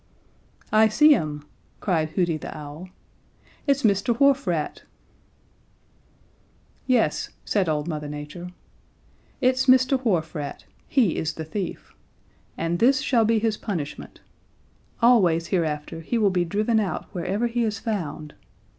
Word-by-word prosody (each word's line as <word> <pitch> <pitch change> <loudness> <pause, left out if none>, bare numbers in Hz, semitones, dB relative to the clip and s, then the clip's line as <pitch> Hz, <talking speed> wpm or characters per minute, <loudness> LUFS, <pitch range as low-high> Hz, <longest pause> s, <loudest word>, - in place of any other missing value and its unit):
"'I 220 +1 +6
see 300 +8 +6
him!' 150 - -2 0.4
cried 160 -5 0
Hooty 170 0 0
the 155 - -7
Owl. 150 +5 -9 0.8
'It's 280 0 +2
Mr. 220 +3 +2
Wharf 280 -2 +4
Rat!' 165 -4 -2 2.1
"'Yes,' 235 - +1 0.2
said 195 -5 +1
old 150 0 -1
Mother 150 -3 -4
Nature, 150 +4 -7 0.9
'it's 255 +1 +2
Mr. 255 +1 +4
Wharf 170 -9 0
Rat 145 -2 -6 0.2
he 240 - +2
is 160 - -2
the 160 - -5
thief. 180 +3 -5 0.6
And 165 +1 -1
this 265 +3 +4
shall 235 -4 +2
be 225 +1 +3
his 220 -1 0
punishment: 165 -9 -6 0.8
Always 180 -9 +4
hereafter 160 -2 -2
he 200 +9 -2
will 210 -3 +3
be 180 -1 +1
driven 215 +6 +1
out 200 -4 -2
wherever 195 +5 -1
he 235 0 0
is 215 -1 -1
found. 155 -8 -4
190 Hz, 130 wpm, -24 LUFS, 160-230 Hz, 2.1 s, I